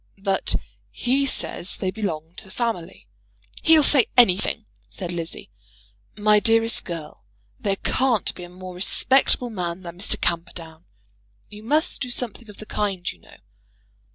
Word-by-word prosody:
"But 195 -1 0 0.3
he 270 +3 +1
says 185 -7 0
they 185 - -1
belong 170 -6 -4
to - - -6
the - - -15
family." 195 -5 -3 0.6
"He'll 320 -1 +6
say 275 -5 +6
anything," 215 -1 +4 0.2
said 180 -3 -6
Lizzie. 170 - -6 0.7
"My 210 0 +5
dearest 225 +1 +3
girl, 160 - -7 0.4
there 200 -1 0
can't 240 0 +1
be - - -10
a 175 - -9
more 185 +1 -9
respectable 245 +6 +2
man 180 -2 -4
than 170 0 -9
Mr. 200 - -1
Camperdown. 165 -1 -2 0.7
You 210 0 -10
must 300 +9 0
do 250 - -2
something 235 -2 -4
of 205 - -12
the 215 - -9
kind, 200 -4 -2
you - - -17
know." - - -18
200 Hz, 150 wpm, -23 LUFS, 175-230 Hz, 0.7 s, He'll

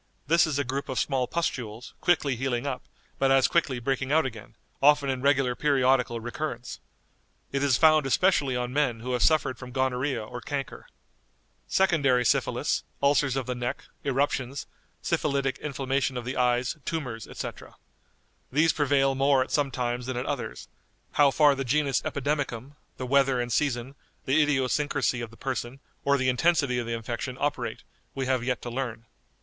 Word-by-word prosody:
This 165 +3 +4
is 150 -3 -1
a 145 - +1
group 135 +2 -4
of 130 - -3
small 130 -3 0
pustules, 125 -7 -3
quickly 145 -6 +2
healing 125 0 -2
up, 130 -3 -3 0.4
but 135 - +3
as 135 -1 +5
quickly 150 -6 +1
breaking 130 +2 -2
out 160 0 +4
again, 115 -5 -7 0.3
often 145 -1 +5
in 130 -1 -3
regular 135 -2 +3
periodical 130 -4 +2
recurrence. 125 +1 -5 0.7
It 140 - -1
is 140 -3 +3
found 155 -3 +5
especially 140 -3 +2
on 125 0 -2
men 135 -6 +1
who 125 +2 -3
have 125 - 0
suffered 140 -6 +2
from 125 - -8
gonorrhoea 130 -1 -1
or 120 +2 -8
chancre." 140 +1 -5 0.8
"Secondary 145 -10 +3
syphilis, - - +1 0.2
ulcers 140 -1 +2
of 135 -2 -1
the 125 - -2
neck, 120 0 -4 0.2
eruptions, 135 -1 -1 0.4
syphilitic 140 -2 0
inflammation 135 -2 -1
of 120 - -5
the 125 - -3
eyes, 125 +3 +1
tumors, 125 - -4
etc. - - -7 0.8
These 155 +5 +3
prevail 140 -2 +2
more 135 0 +3
at - - -12
some 145 -2 +1
times 125 -1 -3
than 130 -1 -3
at 125 - -2
others; - - -4 0.4
how 145 -1 +5
far 145 +1 +5
the 135 0 -3
genus 140 +1 +1
epidemicum, 140 -3 -2 0.3
the 130 - -4
weather 135 -1 +3
and 120 0 -2
season, 130 -3 0 0.3
the 145 +4 +3
idiosyncrasy 140 -2 +1
of 115 - -5
the 115 - -17
person, 130 0 -4 0.2
or 140 0 +3
the 130 -1 0
intensity 135 -1 +2
of 120 - -4
the 115 - -2
infection 120 +3 -4
operate, 145 0 -2 0.3
we 135 -1 -2
have 130 -2 0
yet 125 0 -2
to 120 - -5
learn." 120 -3 -4
135 Hz, 170 wpm, -27 LUFS, 125-145 Hz, 0.8 s, as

